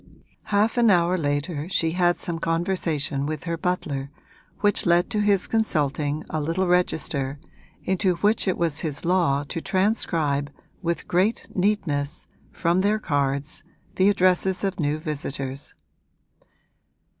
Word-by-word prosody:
Half 215 +3 +2
an 235 -2 +5
hour 175 -1 +4
later 145 0 -2
she 165 -4 +1
had 175 0 +2
some 170 -1 -3
conversation 165 -5 -1
with 155 -2 -4
her 170 0 -2
butler 155 -6 -2 0.5
which 205 -3 +3
led 175 +1 +3
to 210 - 0
his 205 -2 +3
consulting 150 -8 0
a 155 - -1
little 165 +5 0
register 150 -6 0 0.4
into 190 -1 +1
which 205 +4 +1
it 185 - +1
was 165 -3 +1
his 150 -2 -3
law 170 -6 +2
to 165 +4 -5
transcribe 165 -8 0 0.3
with 170 -2 -2
great 190 +6 +1
neatness, 175 -8 -1 0.3
from 175 +1 +1
their 205 +2 +2
cards, 140 -5 -1 0.4
the 190 +2 +5
addresses 185 0 +2
of 195 -2 -1
new 150 -1 0
visitors. 140 -3 -5
170 Hz, 135 wpm, -24 LUFS, 145-185 Hz, 0.5 s, an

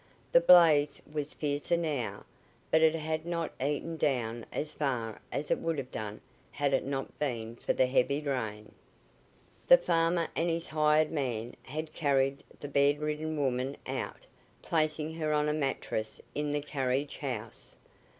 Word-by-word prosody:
The - - +7
blaze 155 - +6
was 150 -1 -2
fiercer 145 +3 0
now, 150 -8 -2 0.5
but 160 - +5
it 160 0 +5
had 155 0 -2
not 170 -1 -3
eaten 150 +3 -2
down 120 -6 -1
as 150 +1 -3
far 120 -7 -2
as 145 - -3
it - - +2
would 165 -1 -1
have 130 -2 -5
done 105 -1 -5 0.3
had 145 -1 0
it 135 - +2
not 135 0 -4
been 115 -5 -2
for - - -1
the 130 - +3
heavy 135 +2 +2
rain. 110 -8 -3 1.0
The - - +10
farmer 165 - +1
and 170 +1 +1
his 165 0 -1
hired 155 0 +3
man 125 -6 -2
had 155 +3 -6
carried 140 -2 +1 0.2
the 145 - -5
bedridden 150 +2 +1
woman 135 -1 -1
out, - - -5 0.4
placing 155 -1 0
her 155 -2 -1
on 150 0 +2
a 150 - +1
mattress 135 -7 -2
in 150 0 -1
the 145 0 0
carriage 135 0 -1
house. 115 -6 -6
145 Hz, 155 wpm, -30 LUFS, 130-155 Hz, 1.0 s, The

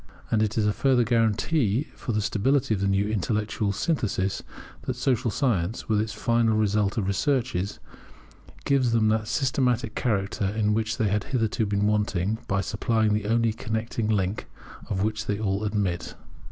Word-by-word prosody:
And 110 -2 +3
it 110 0 0
is 110 - +2
a 105 - +2
further 130 -1 +3
guarantee 115 +2 +1
for - - -5
the 105 -2 0
stability 115 +4 +1
of 100 - -2
the 100 - +1
new 100 +1 +2
intellectual 105 +1 -1
synthesis 100 - -1 0.4
that 130 - -3
Social 125 -1 +1
science, 105 - -1
which 105 -2 +2
is 110 - -5
the 105 - -10
final 115 -2 +2
result 105 -1 +1
of 110 - +1
our - - -3
researches, 115 -3 0 0.9
gives 130 -4 +2
them 110 -2 +3
that 110 0 0
systematic 130 0 0
character 100 -4 -1
in 105 +1 +1
which 110 0 -1
they 110 -3 +1
had 105 +1 0
hitherto 115 -4 0
been 100 0 +1
wanting, 105 -1 0
by 100 0 +1
supplying 110 +2 +1
the 105 -1 -1
only 115 0 +2
connecting 110 0 -3
link 100 -1 0 0.4
of 95 -2 0
which 110 0 -2
they 105 - 0
all 100 -1 -1
admit. 100 -5 -2
110 Hz, 175 wpm, -26 LUFS, 100-115 Hz, 0.9 s, And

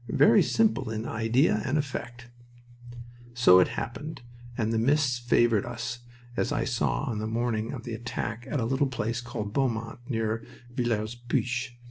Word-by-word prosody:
Very - - +6
simple 215 - +2
in 110 0 -3
idea 115 +7 +2
and 140 +2 0
effect! 125 -4 -4 1.1
So 105 -7 +7
it 90 - +5
happened, 145 +4 -5 0.3
and 110 -2 0
the 115 - +2
mists 130 0 +2
favored 120 -3 +3
us, 120 0 -5 0.4
as - - 0
I - - +1
saw 60 -1 0
on 110 -3 -2
the 110 - -2
morning 115 -1 -1
of 125 -4 -6
the 120 - -5
attack 115 +1 -4
at 145 - 0
a 115 - 0
little 135 +4 +1
place 120 -2 -2
called 105 -4 -5
Beaumont, 115 -3 -1
near 110 -2 -1 0.3
Villers 115 -3 -1
Pluich. 120 0 -2
120 Hz, 160 wpm, -28 LUFS, 110-125 Hz, 1.1 s, So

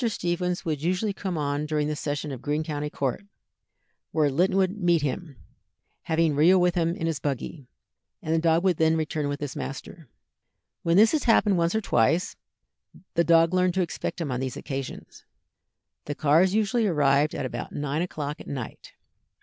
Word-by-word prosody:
Stephens 180 -2 -2
would 155 -4 -2
usually 185 +5 0
come 190 -3 -4
on 145 0 -1
during 150 -1 0
the 150 - -2
session 145 0 -3
of 130 - -7
Greene 150 +2 -1
County 150 -2 -3
court, 140 +6 -2 0.9
where 150 -3 +2
Linton 180 +7 +2
would 195 +2 0
meet 170 -3 +3
him, 150 +1 -3 0.7
having 160 -1 +1
Rio 170 +6 +5
with 180 -1 +3
him 170 -1 0
in 165 - -4
his 165 -3 -1
buggy, 140 0 -4 0.5
and 160 - -2
the 165 - +3
dog 165 +1 +2
would 185 -4 +2
then 160 0 +3
return 155 -2 -2
with 145 0 -3
his 145 -3 -5
master. 140 +2 -7 0.7
When 170 +1 +2
this 220 +2 +6
had 310 - 0
happened 210 -5 +4
once 170 +4 +1
or 220 - +1
twice, 160 - +1 0.8
the 170 - +3
dog 165 0 +4
learned 185 -1 +2
to 190 - +2
expect 170 - -4
him 155 -5 -3
on 125 - -2
these 130 -1 -4
occasions. 135 -3 -7 0.8
The 145 - -4
cars 165 +7 +3
usually 220 +1 +2
arrived 145 -3 +2
at - - -3
about 130 - -5
nine 145 +2 -2
o'clock 150 -4 -4
at - - -12
night. 130 -5 -7
160 Hz, 180 wpm, -26 LUFS, 145-180 Hz, 0.9 s, this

